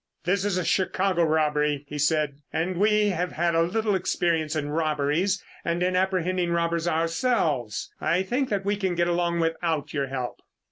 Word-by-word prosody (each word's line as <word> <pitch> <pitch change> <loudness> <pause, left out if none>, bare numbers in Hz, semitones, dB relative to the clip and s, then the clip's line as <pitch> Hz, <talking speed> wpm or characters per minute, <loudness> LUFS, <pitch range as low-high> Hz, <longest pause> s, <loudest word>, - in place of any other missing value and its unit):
"This 190 +3 +1
is 200 -3 0
a 180 - -1
Chicago 185 -2 +1
robbery," 150 -2 +1
he 150 +1 -6
said, 150 -1 +1
"and 175 +3 -1
we 210 +1 +3
have 180 -2 -2
had 170 +1 +1
a 165 - +3
little 210 +5 0
experience 165 -4 0
in 145 -1 -2
robberies 155 +5 0 0.2
and 170 +1 0
in 180 0 +1
apprehending 185 -1 +1
robbers 170 0 0
ourselves. 160 - 0
I 180 +3 +2
think 250 +7 -1
that 200 -2 -1
we 205 +1 +1
can 190 -3 -1
get 175 0 +1
along 170 -1 +1
without 165 -2 -1
your 140 -2 -1
help." 130 -2 -5
170 Hz, 175 wpm, -26 LUFS, 155-185 Hz, 0.2 s, we